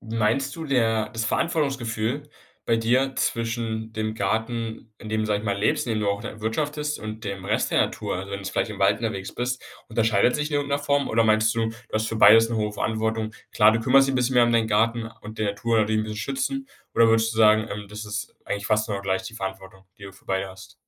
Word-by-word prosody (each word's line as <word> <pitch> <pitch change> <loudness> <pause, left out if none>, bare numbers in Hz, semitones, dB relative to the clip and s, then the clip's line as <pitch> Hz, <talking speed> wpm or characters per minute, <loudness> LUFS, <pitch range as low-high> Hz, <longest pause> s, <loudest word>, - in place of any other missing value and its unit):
meinst 115 +5 0
du, 165 - -5
der 115 -6 +1
das 115 -1 -3
Verantwortungsgefühl 135 -3 -1 0.4
bei 115 - +2
dir, 125 +4 +1
zwischen 115 -1 -2
dem 110 0 -2
Garten, 110 +2 -2
in 110 - -9
dem 110 0 0
du, 110 - -1
sage 105 -1 0
ich - - -10
mal, 100 -2 -1
lebst, 105 - +1
in 115 - 0
dem 110 - -1
du 105 - 0
auch 100 0 0
dann 115 -2 -7
wirtschaftest 150 +6 -2
und 110 +1 -7
dem 100 -2 -5
Rest 105 +3 0
der - - +3
Natur? - - -1
Also, 95 +2 -6
wenn 100 0 -5
du 100 - -4
vielleicht - - -1
im 105 - -7
Wald 100 +1 +3
unterwegs 105 -4 -4
bist, 125 +1 -2 0.3
unterscheidet 110 0 +2
sich 150 0 -1
in - - -2
irgend 145 0 -2
'ner 140 - +2
Form 145 0 +1
oder 115 +1 +3
meinst 110 +1 +3
du, 115 -1 +1
du 115 - -7 0.2
hast 110 0 0
für 115 - -3
beides 115 +2 +7
'ne 115 - -2
hohe 105 -1 -1
Verantwortung? 110 0 -2 0.2
Klar, 105 +1 +6
du 115 - 0
kümmerst 135 +3 +5
dich 135 - +1
'n - - +2
bisschen 125 +1 +1
mehr 120 -1 +6
um 120 - +1
deinen 115 -1 +2
Garten 115 +1 +1
und 110 +1 -10
der 110 -1 0
Natur, 115 +2 +1
indem 110 0 +1
du 110 - -6
sie 105 - -5
schützen 140 - -2 0.3
oder 115 - +6
würdest 115 0 +3
du - - -5
sagen, 110 0 +5
ähm, 105 0 -5
das 105 +2 -7
ist 105 +1 -5
eigentlich 100 0 -3
fast 110 0 +2
genau 100 -2 -2
gleich 95 -1 -1
die 95 +4 -8
Verantwortung, 95 -2 -7
die 100 - -11
du 95 - -9
für 95 - -20
beide 95 0 -1
hast? 95 +2 -13
110 Hz, 250 wpm, -24 LUFS, 105-120 Hz, 0.4 s, beides